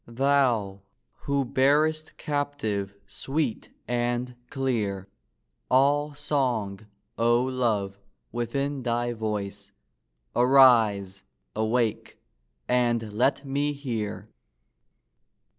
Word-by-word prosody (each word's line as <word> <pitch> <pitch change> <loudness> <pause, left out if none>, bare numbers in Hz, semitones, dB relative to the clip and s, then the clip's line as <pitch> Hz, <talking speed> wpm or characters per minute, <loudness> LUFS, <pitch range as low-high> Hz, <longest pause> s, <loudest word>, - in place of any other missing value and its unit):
Thou, 120 -6 +1 0.3
who 140 -1 -1
bear'st 150 +5 +1
captive, 110 -10 -2
sweet 135 +3 -3 0.2
and 120 +1 -1
clear, 110 -8 -2 0.6
All 145 +3 +3
song, 120 -9 -1 0.3
O 120 +1 +3
love, 110 -7 -1 0.3
within 135 +4 -2
thy 120 0 -1
voice! 105 -3 -4 0.6
Arise! 115 -7 +5 0.3
awake! 110 +1 -1 0.5
and 120 -3 +1
let 135 +5 +1
me 145 +2 0
hear! 115 -7 -4
120 Hz, 75 wpm, -26 LUFS, 110-140 Hz, 0.6 s, Arise